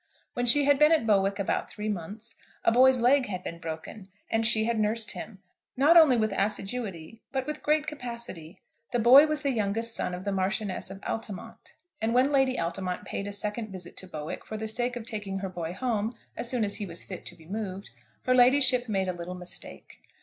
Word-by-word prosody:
When 245 0 -1
she 285 +4 +6
had 285 -1 +4
been 300 +1 +6
at 315 -7 +3
Bowick 200 -2 +2
about 200 - -1
three 210 0 -6
months, 210 +4 -5 0.3
a - - +4
boy's 255 +2 +6
leg 255 +3 +3
had 185 -3 -5
been 170 - -6
broken, 165 +5 -7 0.2
and 225 0 +2
she 220 -1 +3
had 230 0 0
nursed 215 +1 +1
him, 195 -3 -8 0.3
not 295 +6 +5
only 310 -7 +7
with 215 -2 +1
assiduity, 200 -1 -3
but 265 -1 -2
with 300 - -5
great 300 0 +2
capacity. 235 - -6 0.4
The - - +3
boy 255 +6 +8
was 305 0 -2
the 280 - +1
youngest 225 0 -1
son 180 - -1
of 180 - -8
the 200 - 0
Marchioness 190 0 -1
of 195 +1 -9
Altamont; 210 -5 -6 0.3
and 225 +2 0
when 260 +3 +4
Lady 265 -2 +2
Altamont 180 +2 -3
paid 200 - -4
a - - -4
second 210 +2 -3
visit 180 -2 -8
to 190 - -7
Bowick, 155 -3 -6
for 215 - -6
the 220 +1 -4
sake 240 +3 0
of 240 -2 -6
taking 205 -4 -4
her 195 0 -4
boy 170 -2 -5
home 220 +2 -2 0.2
as 235 - -3
soon 245 -3 +1
as 200 - -3
he 205 - -4
was 170 -1 -5
fit 185 -3 -8
to 180 - -8
be 160 -2 -18
moved, 195 - -5 0.3
her 255 - +3
ladyship 255 -1 +4
made 190 -2 0
a 185 - -1
little 175 +1 -6
mistake. 180 0 -10
215 Hz, 215 wpm, -28 LUFS, 190-245 Hz, 0.4 s, boy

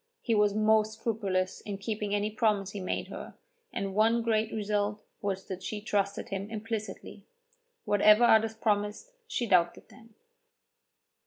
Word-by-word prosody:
He 230 - +1
was 210 -1 +3
most 215 0 +3
scrupulous 200 -5 -2
in 205 -2 -5
keeping 210 0 -2
any 205 +1 0
promise 210 -3 +1
he 205 - -6
made 185 - -3
her, - - -8 0.4
and 195 -1 -3
one 225 +3 +3
great 220 -1 +1
result 210 0 -1 0.2
was 195 -2 -2
that 190 -1 -6
she 210 +3 -4
trusted 200 -1 -1
him 195 +1 -4
implicitly. 220 0 -6 0.6
Whatever 210 +2 +5
others 225 -1 +5
promised, 210 - -1 0.2
she 250 - -1
doubted 175 -5 +2
them. 230 -3 -18
210 Hz, 145 wpm, -29 LUFS, 200-220 Hz, 0.6 s, Whatever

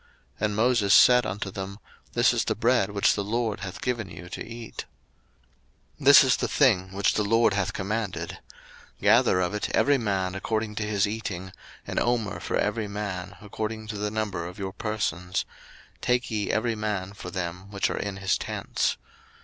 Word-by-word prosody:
And 105 -1 0
Moses 110 -3 +4
said 125 0 +7
unto 100 0 -4
them, 95 +1 -6 0.4
This - - +4
is - - 0
the - - 0
bread 115 -2 +2
which 100 -1 +3
the 100 - -2
LORD 110 0 -1
hath 100 -1 -7
given 120 -6 -2
you 90 -1 -10
to - - -5
eat. 115 0 -8 1.1
02:016:016 140 - -9
This 140 0 +10
is 130 -1 +3
the - - -1
thing 95 -10 +3
which 100 +1 +1
the 105 - +1
LORD 115 +1 +3
hath 100 -2 0
commanded, 95 -4 -3 0.6
Gather 90 - +4
of 90 +3 -1
it 105 - -2
every 145 -1 +4
man 95 -4 -1
according 110 +2 -2
to 110 - 0
his 105 -1 +1
eating, 100 -4 -4 0.3
an - - -1
omer 120 -4 0
for - - -2
every 110 -2 0
man, 100 -3 -5
according 110 +1 -5
to 105 - -4
the 105 0 -1
number 105 -5 -3
of 90 - -10
your 95 -1 -4
persons; 95 -5 -2 0.6
take 125 0 +1
ye 105 -2 -1
every 115 +1 +1
man 105 -3 -3
for 100 - -8
them 90 +1 -5
which 100 -1 0
are - - -3
in 100 -1 -4
his 95 -1 0
tents. - - -1
105 Hz, 180 wpm, -26 LUFS, 95-115 Hz, 1.1 s, This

